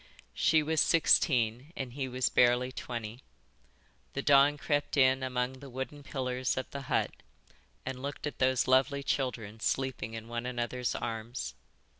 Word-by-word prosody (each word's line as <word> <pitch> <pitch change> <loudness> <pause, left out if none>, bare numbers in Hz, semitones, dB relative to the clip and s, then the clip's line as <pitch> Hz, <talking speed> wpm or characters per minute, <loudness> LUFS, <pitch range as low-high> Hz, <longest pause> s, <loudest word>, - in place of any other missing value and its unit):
She 160 -1 +3
was 160 0 +2
sixteen 130 -3 +3
and 130 -3 -5
he 135 -1 -3
was 130 0 0
barely 125 +1 +3
twenty. 115 -2 -6 0.9
The - - -3
dawn 145 +1 +5
crept 145 0 -1
in 130 -1 +5
among 130 0 -2
the 140 0 -10
wooden 130 +3 -6
pillars 130 -3 -2
of 130 - -2
the 140 - -5
hut - - +1 0.7
and 130 -1 -5
looked 140 +1 -5
at 150 - -5
those 130 -1 +2
lovely 135 +2 +3
children 115 -6 -2
sleeping 115 -1 -2
in 115 0 -7
one 120 +1 -4
another's 125 0 -2
arms. 110 - -4
130 Hz, 150 wpm, -31 LUFS, 120-140 Hz, 0.9 s, dawn